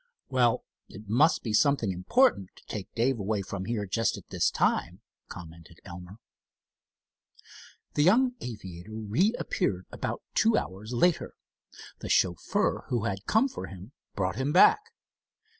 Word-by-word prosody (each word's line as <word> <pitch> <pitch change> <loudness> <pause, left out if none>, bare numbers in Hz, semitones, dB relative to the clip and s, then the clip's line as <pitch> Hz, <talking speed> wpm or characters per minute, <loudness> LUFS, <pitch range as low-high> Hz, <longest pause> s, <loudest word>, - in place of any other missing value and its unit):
"Well, 125 -3 +2 0.3
it 105 +1 -12
must 130 +10 +3
be 110 - -3
something 135 -4 +3
important 95 - +2
to - - -19
take 105 -3 -6
Dave 120 +1 +1
away 100 0 -1
from 95 0 -5
here 110 -1 -2
at 95 - -10
just 115 +2 0
this - - +2
time," - - 0 0.3
commented 85 0 -12
Elmer. 90 +2 -10 1.8
The 145 - +1
young 245 - +4
aviator 105 -4 -8
reappeared 175 - 0
about - - -4
two 225 0 +3
hours 100 +5 -5
later. 170 +8 +1 0.6
The - - -7
chauffeur 90 -3 +1
who 120 -4 -1
had 100 -3 -4
come 225 +5 +3
for 265 - -7
him 95 +5 -11 0.2
brought 95 0 -1
him 135 +3 -1
back. 180 - +7
110 Hz, 140 wpm, -28 LUFS, 95-140 Hz, 1.8 s, back